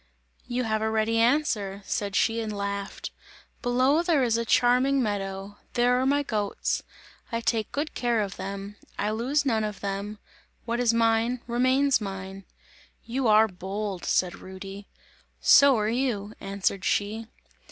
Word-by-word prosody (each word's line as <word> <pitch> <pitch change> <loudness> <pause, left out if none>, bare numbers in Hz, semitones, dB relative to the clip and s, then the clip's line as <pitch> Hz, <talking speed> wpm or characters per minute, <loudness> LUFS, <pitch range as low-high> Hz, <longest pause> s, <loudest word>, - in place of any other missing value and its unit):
"You 250 +1 -1
have 220 -2 0
a 220 - +1
ready 220 +1 +1
answer," 225 -6 +1
said 200 -1 -2
she 230 +2 +2
and 220 -1 -3
laughed; 200 -1 -4 0.5
"below 255 +6 +3
there 335 -6 +2
is 230 -2 +2
a 230 - 0
charming 255 +3 +3
meadow! 195 -1 -4 0.2
There 245 +1 +3
are 260 - +1
my 285 +1 +2
goats! 210 -6 -1 0.5
I 230 - -1
take 225 -2 -1
good 295 +2 -3
care 240 -3 +1
of 200 -2 -3
them! 195 +2 -6 0.2
I 210 +1 0
lose 265 +7 0
none 225 -5 +1
of 210 -2 -4
them, 200 +1 -4 0.5
what 235 +1 -1
is 245 -2 +3
mine, 230 +1 +2
remains 255 +2 +2
mine!" 195 -1 -6 0.6
"You 250 +1 -1
are 215 +1 +6
bold!" 195 0 -5
said 180 -1 0
Rudy. 195 +1 -9 0.5
"So 280 -3 +7
are 210 -1 0
you!" 225 -4 -1
answered 195 -1 -2
she. 215 +2 -1
220 Hz, 150 wpm, -26 LUFS, 200-245 Hz, 0.6 s, So